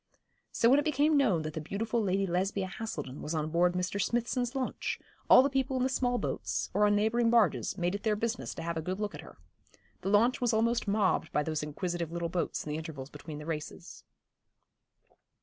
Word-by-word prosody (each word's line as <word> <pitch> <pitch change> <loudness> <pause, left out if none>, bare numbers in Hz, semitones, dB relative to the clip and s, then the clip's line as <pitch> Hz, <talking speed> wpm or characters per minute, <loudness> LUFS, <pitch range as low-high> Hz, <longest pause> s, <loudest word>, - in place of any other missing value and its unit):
So 230 - +3
when 270 +4 +6
it 290 - -1
became 300 0 +3
known 205 - +3
that 155 0 -5
the 160 - -4
beautiful 220 +8 -2
Lady 195 -1 +1
Lesbia 190 +2 0
Haselden 155 -10 -6
was 155 - -3
on 155 0 -2
board 175 +2 +3
Mr. 180 +2 -1
Smithson's 240 +3 -1
launch, 260 -1 -2 0.3
all 255 - +9
the - - +3
people 265 -1 0
in 250 - +1
the 260 - +2
small 245 -1 +1
boats, - - -3
or 210 0 +4
on 205 - +3
neighbouring 225 +3 +2
barges, 195 - +2
made 175 +1 0
it 200 - -3
their 215 -1 +1
business 230 +3 -3
to 165 - -6
have 170 0 -3
a - - -1
good 185 +4 -3
look 210 -1 -2
at - - -8
her. - - -14 0.6
The 195 - -2
launch 230 +6 +3
was 245 -2 +2
almost 230 +1 +1
mobbed 200 -1 +1
by 150 - +1
those 155 0 -2
inquisitive 170 +2 -3
little 170 0 -2
boats 175 0 -2
in 150 - -4
the 150 - -2
intervals 150 -4 -7
between 150 +1 -8
the 150 - -8
races. 155 -2 -6
195 Hz, 215 wpm, -30 LUFS, 165-235 Hz, 0.6 s, all